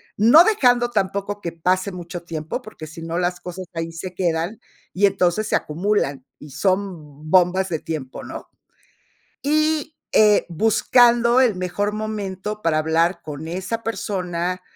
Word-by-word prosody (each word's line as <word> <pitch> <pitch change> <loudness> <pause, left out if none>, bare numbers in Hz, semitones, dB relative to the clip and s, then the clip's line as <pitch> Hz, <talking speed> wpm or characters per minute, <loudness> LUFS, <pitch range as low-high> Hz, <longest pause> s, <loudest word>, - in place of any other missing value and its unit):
No 240 - +7
dejando 245 - +3
tampoco 200 +1 -2
que 170 - -4
pase 185 +4 0
mucho 175 -1 -7
tiempo, 160 - -5
porque, 215 -9 -10
si 160 +2 -10
no 165 +1 -4
las 180 0 -1
cosas 180 +1 -7
ahí 165 0 -4
se 180 +2 -7
quedan, 170 +3 -1 0.3
y 200 +2 +3
entonces 195 +2 +1
se - - +1
acumulan, 150 -5 -1
y 150 - -12
son 155 -3 -2
bombas 185 +1 +4
de 160 -3 -2
tiempo, 150 -6 -6
¿no? - - -8 0.9
Y, 310 +1 0 0.2
eh, 210 -1 +5
buscando 235 +5 +4
el 230 -7 +3
mejor 185 +3 -2
momento 210 -1 -4
para 155 -2 +1
hablar 165 +3 +1
con 150 +1 -7
esa 190 +6 -3
persona, 180 -5 -3
185 Hz, 145 wpm, -22 LUFS, 165-215 Hz, 0.9 s, No